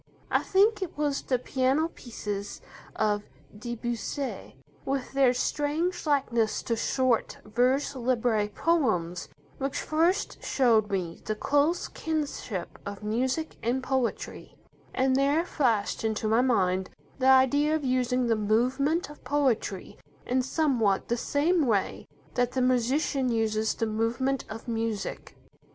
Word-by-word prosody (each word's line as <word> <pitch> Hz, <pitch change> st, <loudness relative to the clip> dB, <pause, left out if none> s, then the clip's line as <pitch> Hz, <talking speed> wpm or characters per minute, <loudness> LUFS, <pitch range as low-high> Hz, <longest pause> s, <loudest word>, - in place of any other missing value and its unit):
I -, -, +3 dB
think 405 Hz, +2 st, +3 dB
it 365 Hz, -5 st, -5 dB
was 290 Hz, -2 st, 0 dB
the 255 Hz, -, 0 dB
piano 265 Hz, +5 st, +1 dB
pieces 205 Hz, -7 st, -6 dB, 0.4 s
of 210 Hz, -1 st, +1 dB, 0.3 s
Debussy, 240 Hz, +4 st, -4 dB, 0.3 s
with 270 Hz, -1 st, -2 dB
their 270 Hz, -2 st, +4 dB
strange 305 Hz, +7 st, -1 dB
likeness 235 Hz, -7 st, +1 dB
to 230 Hz, -, 0 dB
short 255 Hz, 0 st, 0 dB
vers 250 Hz, +6 st, +1 dB
libre 235 Hz, -4 st, +1 dB
poems, 205 Hz, -, 0 dB, 0.3 s
which 275 Hz, 0 st, -2 dB
first 335 Hz, +6 st, 0 dB
showed 225 Hz, -6 st, +3 dB
me 180 Hz, -4 st, -3 dB
the 215 Hz, -, -1 dB
close 290 Hz, +9 st, +1 dB
kinship 290 Hz, -, -4 dB
of 200 Hz, +1 st, -7 dB
music 260 Hz, +9 st, -1 dB
and 250 Hz, +3 st, -1 dB
poetry, 260 Hz, -2 st, -2 dB, 0.4 s
and 260 Hz, 0 st, +2 dB
there 285 Hz, +5 st, +2 dB
flashed 230 Hz, -13 st, 0 dB
into 220 Hz, 0 st, -1 dB
my 225 Hz, +3 st, +4 dB
mind 190 Hz, -7 st, +1 dB, 0.3 s
the 260 Hz, -, +2 dB
idea 280 Hz, +4 st, +5 dB
of 305 Hz, -3 st, -2 dB
using 255 Hz, 0 st, +1 dB
the 230 Hz, -1 st, +2 dB
movement 255 Hz, +10 st, +1 dB
of 295 Hz, -, -13 dB
poetry 255 Hz, -, -1 dB, 0.3 s
in 255 Hz, +1 st, +1 dB
somewhat 255 Hz, -8 st, +1 dB
the 235 Hz, -, +2 dB
same 295 Hz, +5 st, +1 dB
way 205 Hz, -4 st, 0 dB, 0.3 s
that 245 Hz, 0 st, 0 dB
the 260 Hz, -, 0 dB
musician 255 Hz, +2 st, +1 dB
uses 220 Hz, -1 st, 0 dB
the 225 Hz, -, -1 dB
movement 230 Hz, +5 st, -1 dB
of 225 Hz, +3 st, -8 dB
music. 225 Hz, -3 st, -3 dB
255 Hz, 130 wpm, -28 LUFS, 220-280 Hz, 0.4 s, idea